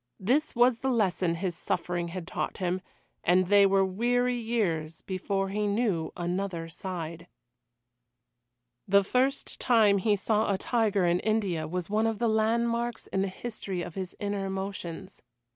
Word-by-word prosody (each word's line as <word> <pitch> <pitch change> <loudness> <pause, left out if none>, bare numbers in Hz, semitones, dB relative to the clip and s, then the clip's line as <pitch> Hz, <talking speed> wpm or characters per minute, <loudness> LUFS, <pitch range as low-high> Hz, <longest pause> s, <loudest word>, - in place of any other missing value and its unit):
This 260 +11 +1
was 240 0 +4
the 265 - -1
lesson 190 -7 +1
his 175 0 -2
suffering 175 0 -2
had 175 0 -6
taught - - -3
him, 185 0 -1 0.4
and 180 +1 +3
they 200 -1 +7
were 195 0 +3
weary 245 +6 +1
years 190 -10 -1
before 195 +1 -2
he 210 +1 -1
knew 200 -6 0
another 175 -1 -2
side. 170 -1 -6 1.6
The 200 0 +5
first 260 +7 0
time 215 -5 +4
he 205 +2 +2
saw 210 +1 +1
a 195 - +1
tiger 210 -3 +1
in 175 +1 +3
India 195 -8 0
was 175 +1 -3
one 215 +2 +1
of 225 -1 -1
the 235 - +1
landmarks 235 +2 +1
in 190 - +2
the 195 - +1
history 190 -2 -5
of 175 - -7
his 185 0 -5
inner 200 -1 -2
emotions. 190 -1 -5
195 Hz, 155 wpm, -28 LUFS, 180-220 Hz, 1.6 s, they